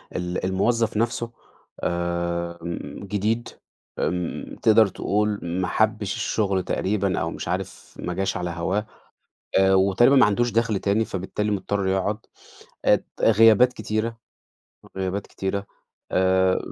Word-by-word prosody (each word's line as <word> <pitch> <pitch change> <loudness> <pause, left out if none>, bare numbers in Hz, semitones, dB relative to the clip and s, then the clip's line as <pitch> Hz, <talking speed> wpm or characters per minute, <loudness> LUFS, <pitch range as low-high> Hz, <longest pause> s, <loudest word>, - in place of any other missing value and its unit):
ال 90 +1 -2
الموظّف 110 +4 +1
نفسه 120 +1 -1 0.5
آمم 85 0 -3
جديد. 105 +4 -1 0.5
آمم 90 0 -2
تقدر 110 -1 +6
تقول 105 +2 -1
ما 90 +2 -2
حبّش 110 -2 +1
الشغل 100 -5 0
تقريبًا، 100 -1 0
أو - - -2
مش - - -6
عارف - - -5
ما 90 - -3
جاش 95 +1 -1
على 90 -1 -3
هواه. 95 +5 -1 0.7
أ 95 0 +5
وتقريبًا 100 +8 +5
ما 130 - +7
عندوش 120 +3 +1
دَخْل 115 -3 +1
تاني 105 +3 +1
فبالتالي 105 +3 -3
مضطر 100 0 -1
يقعد. 95 +2 0 0.7
ات - - +4 0.2
غيابات 115 +3 +6
كتيرة، 110 +1 -2 0.8
غيابات 95 +1 -2
كتيرة. 100 +1 -3 0.5
آآ 95 0 +3
100 Hz, 120 wpm, -24 LUFS, 95-110 Hz, 0.8 s, ما